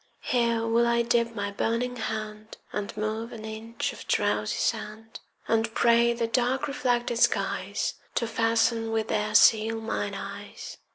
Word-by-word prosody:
Here 235 -2 +1
will 230 +1 +3
I 235 0 +2
dip 235 0 +1
my 200 -1 -2
burning 230 +4 -1
hand 215 -1 -5 0.2
And 205 -1 -4
move 220 +2 -3
an 220 -2 -8
inch 220 +1 -4
of - - -11
drowsy - - +1
sand, 220 +1 -3 0.3
And 225 0 +1
pray 235 0 +4
the 235 0 -1
dark 245 +3 0
reflected 245 -4 0
skies - - +1 0.2
To 235 - +1
fasten 225 0 +1
with 220 0 -1
their 210 0 -1
seal 225 0 +5
mine 225 0 -3
eyes. - - -8
225 Hz, 150 wpm, -27 LUFS, 220-235 Hz, 0.3 s, seal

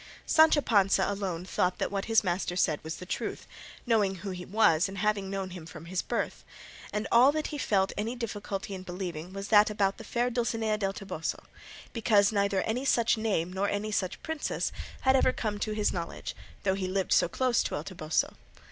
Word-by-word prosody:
Sancho 315 -2 +5
Panza 200 -7 +3
alone 190 -4 -3
thought 180 -1 0
that - - -2
what 195 -1 -2
his 225 -1 +3
master 175 -1 -1
said 155 -4 +1
was 160 +1 -4
the 180 - -9
truth, - - -4 0.4
knowing 210 -5 +2
who 190 +2 -6
he 180 -1 -6
was 190 -4 +3
and 195 - -8
having 205 -1 0
known 195 -1 -3
him 175 -3 -8
from 160 -1 -10
his 180 +2 -2
birth; - - -3 0.5
and 210 +1 -2
all 250 +4 +7
that 310 0 -2
he 295 - -3
felt 195 -6 +2
any 220 +4 -2
difficulty 205 -4 -4
in 190 - -5
believing 180 -2 -5
was 195 +1 -6
that 210 -1 +6
about 200 -2 0
the - - -7
fair 245 0 0
Dulcinea 225 -2 0
del 195 -1 0
Toboso, 185 -6 -4 0.5
because 215 -3 +4
neither 200 -2 +1
any 240 +4 -1
such 235 -4 +3
name 195 -6 -1
nor 195 +2 0
any 210 +1 -2
such 185 -3 -2
princess 320 -2 -2 0.3
had 265 0 +4
ever 260 - +4
come 215 -4 -3
to 215 - -1
his 210 -1 +1
knowledge 170 -2 -5 0.3
though 190 -2 +2
he 190 -1 -2
lived 190 0 0
so - - +4
close 250 +5 +2
to - - -2
El 145 - -3
Toboso. 160 -4 -1
200 Hz, 200 wpm, -29 LUFS, 185-220 Hz, 0.5 s, all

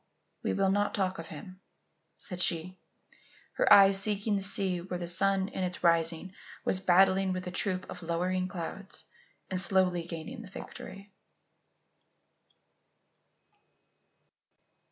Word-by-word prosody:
"We - - -1
will 195 -1 +1
not 205 +1 0
talk 190 -3 -1
of 165 - -7
him," 185 +5 -11 0.6
said 180 -2 -7
she, 175 +2 +1 0.7
her - - +1
eyes 195 -1 +7
seeking 205 0 0
the 200 - -1
sea 190 -2 +2
where 180 0 -5
the 175 -1 -5
sun 190 +2 +2
in 190 - -4
its 180 0 -2
rising 170 +2 +1 0.3
was 185 - +1
battling 190 +1 +3
with 185 0 -5
a 180 - -5
troop 185 0 -2
of - - -9
lowering 180 +2 -1
clouds 185 +2 -5 0.5
and 185 -1 +1
slowly 185 -1 +2
gaining 170 +9 -7
the 205 - -12
victory. 195 +1 -10
185 Hz, 130 wpm, -29 LUFS, 175-195 Hz, 0.7 s, eyes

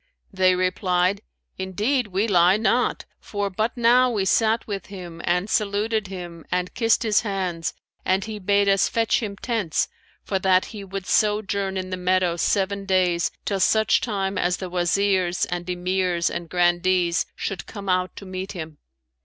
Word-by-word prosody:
They 185 -1 +4
replied, 185 +1 +1 0.4
'Indeed 210 +7 0
we 200 +3 0
lie 180 -1 +5
not, 240 +3 +1
for 205 -1 -3
but 220 +6 -2
now 245 +2 +5
we 210 -5 -1
sat 225 +3 +2
with 200 -2 -5
him 175 -4 -9
and 180 +3 +1
saluted 210 0 0
him 175 -3 -8
and 180 0 -1
kissed 230 0 +2
his 215 -2 +3
hands 185 -5 -3 0.3
and 190 +2 +1
he 215 -1 -6
bade 200 +1 +2
us 195 -1 +3
fetch 230 -1 +1
him 205 -3 -4
tents, 210 -6 -1 0.3
for 195 - -1
that 185 0 +3
he 205 -2 -7
would 195 -1 -6
sojourn 200 -2 +1
in 185 0 -4
the 185 - -2
meadow 180 -1 +1
seven 195 +3 0
days, 180 -3 +2 0.2
till 200 -2 -1
such 220 +3 +3
time 195 -4 -2
as 180 0 +1
the 185 -2 -6
Wazirs 180 0 +1
and 175 0 -4
Emirs 180 -1 0
and 170 -1 -5
Grandees 175 0 +2
should 195 - -4
come 200 -2 -8
out 185 0 0
to 200 - -9
meet 185 +1 -5
him.' 160 -4 -7
190 Hz, 165 wpm, -23 LUFS, 180-205 Hz, 0.4 s, lie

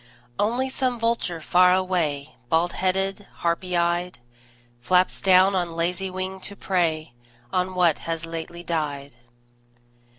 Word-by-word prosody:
Only 240 +5 +1
some 255 -2 -1
vulture 230 -7 0
far 180 +3 +5
away, 160 -6 -1
Bald 165 +4 +2
headed, 195 +2 -1 0.2
harpy 175 +1 0
eyed, 175 +1 0 0.6
Flaps 180 +9 +2
down 190 +1 +5
on 175 -3 -1
lazy 180 +3 -1
wing 185 +1 -5
to 200 +2 -5
prey 165 -7 -1 0.4
On 185 0 0
what 175 -4 +3
has 165 0 -4
lately 165 +1 -7
died. 145 -4 -3
180 Hz, 125 wpm, -24 LUFS, 165-190 Hz, 0.6 s, far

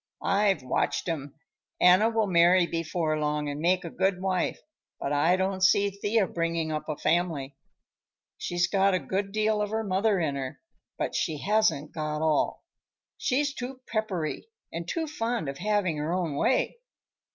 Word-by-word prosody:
I've 195 -7 +2
watched 130 - -1
'em. 145 -4 -4 0.4
Anna 185 +5 +6
will 225 -1 +1
marry 180 -1 +5
before 165 -2 -1
long 150 0 -1
and 145 0 -4
make 180 +2 +2
a 170 - -6
good 190 0 0
wife, 185 -1 -1 0.4
but 140 - -2
I 160 +5 +4
don't 190 0 -1
see 200 +2 +4
Thea 205 +2 +1
bringing 165 -2 -2
up 155 0 -4
a 150 - -2
family. 155 -5 0 0.8
She's 175 0 0
got 195 -1 +3
a - - +1
good 195 +7 -2
deal 215 0 +1
of 210 - -1
her 220 +1 -1
mother 200 0 +1
in 155 -4 0
her, 135 -2 -5 0.4
but - - -2
she 155 -2 -1
hasn't 210 -5 +1
got 155 -1 -3
all. 155 -2 +1 0.5
She's 285 +1 0
too 255 +1 -6
peppery 195 - -2 0.3
and 165 0 -5
too 330 - -1
fond 240 - -2
of 135 0 -5
having 200 -4 0
her 150 +2 -2
own 175 -5 -1
way. 255 - +1
180 Hz, 165 wpm, -27 LUFS, 155-205 Hz, 0.8 s, Anna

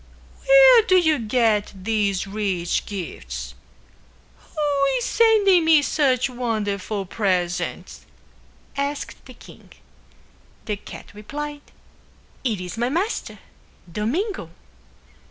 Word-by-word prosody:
"Where - - +8
do 400 -4 +2
you 315 -5 +3
get 220 -2 +1
these 200 -1 -1
rich 195 -4 -2
gifts? 60 - -6 0.9
Who 290 -2 -1
is 245 - -2
sending 415 -6 +4
me 315 -2 +5
such 265 -4 +1
wonderful 215 -5 -3
presents?" 180 -4 -2 0.7
asked 280 +1 -4
the - - -12
king. - - -16 0.9
The 210 -2 -2
cat - - -11
replied, 290 +8 -6 0.8
"It 225 -7 -1
is 180 +4 -6
my 240 +1 +1
master, 365 - -2 0.5
Domingo." 315 - -2
235 Hz, 100 wpm, -22 LUFS, 200-300 Hz, 0.9 s, Where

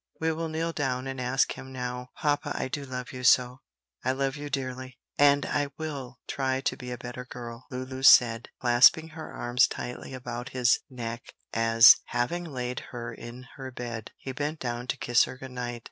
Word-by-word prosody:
We 160 0 +1
will 160 0 -3
kneel 165 +1 -1
down 130 -5 -2
and 135 -1 -4
ask 125 +2 +2
Him 130 - -10
now." 125 -1 -5
"Papa, 145 -1 0
I - - -2
do 140 +1 -4
love 125 -1 -6
you 125 -1 -7
so, 125 +1 +4 0.4
I 130 - +1
love 135 0 -1
you 145 0 -6
dearly, 130 -2 -4 0.2
and 145 0 +5
I 145 -1 0
will 140 -6 -5
try 130 -1 -1
to 135 - -1
be 125 -3 -8
a 125 - -4
better 125 +1 -7
girl," 120 -1 -9
Lulu 130 +1 -5
said, 120 -3 +6
clasping 125 +6 +5
her 160 0 -8
arms 120 +1 +2
tightly 125 +2 -6
about 125 0 -6
his 120 -2 +4
neck, 120 -2 -6 0.2
as, 115 0 +8
having 145 +9 -1
laid 125 -5 -4
her 120 -1 -6
in 120 +2 -10
her 135 -1 -6
bed, 120 -2 -6
he 135 - -6
bent 150 +4 -3
down 120 0 -4
to 135 - -1
kiss 120 -1 +3
her - - -8
good 130 0 -9
night. 120 -1 -4
125 Hz, 190 wpm, -28 LUFS, 120-135 Hz, 0.4 s, as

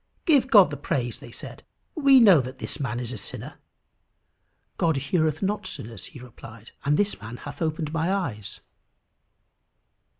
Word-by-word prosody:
"Give 280 -7 +4
God 200 - +7
the 145 - -4
praise," 120 -3 -2
they - - -11
said; - - -10 0.3
"we 275 -4 +6
know 195 - +7
that 130 +1 -8
this 140 - -5
man 120 -4 -2
is 120 -1 -4
a - - -4
sinner." - - -7 1.2
"God 165 -2 +2
heareth 155 +3 0
not 205 0 -1
sinners," 110 - -7
he - - -12
replied; 115 -2 -13
"and 145 +1 +2
this 205 - 0
man 110 +3 -8
hath 145 +4 -10
opened 155 -1 -2
my 165 +2 0
eyes." 120 - -3
150 Hz, 160 wpm, -25 LUFS, 120-190 Hz, 1.2 s, God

